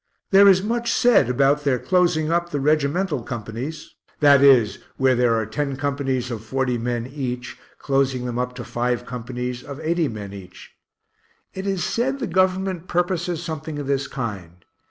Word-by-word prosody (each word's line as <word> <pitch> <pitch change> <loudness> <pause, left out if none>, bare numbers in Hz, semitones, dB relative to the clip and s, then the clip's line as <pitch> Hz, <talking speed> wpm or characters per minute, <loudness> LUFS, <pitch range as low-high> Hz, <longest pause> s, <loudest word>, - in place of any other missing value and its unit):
There 200 +1 +7
is 190 -1 +5
much 235 +2 -1
said 240 - +4
about 140 +3 +2
their 140 -3 +2
closing 170 0 +1
up 170 0 0
the 145 - -2
regimental 150 +2 +1
companies 120 +7 -6 0.3
that 140 -2 +6
is, 130 -7 +5 0.2
where 130 -1 +3
there 120 -2 +2
are 110 -1 0
ten 140 +4 -3
companies 135 -3 -2
of 110 -2 -5
40 125 +1 -1
men 120 0 -2
each, 125 -2 -5 0.2
closing 135 -2 0
them 120 -1 -3
up 125 0 -3
to 125 - -6
five 120 0 -2
companies, 125 0 -5
of 140 +2 -9
80 165 0 0
men 105 -4 -7
each. 90 -2 -12 0.8
It 190 +1 -5
is 195 -3 -1
said 265 +4 -1
the 265 - -3
Government 185 -1 0
purposes 175 -1 -1
something 155 -2 -5
of 145 - -4
this 140 0 -1
kind. 95 -8 -6
140 Hz, 170 wpm, -22 LUFS, 125-170 Hz, 0.8 s, There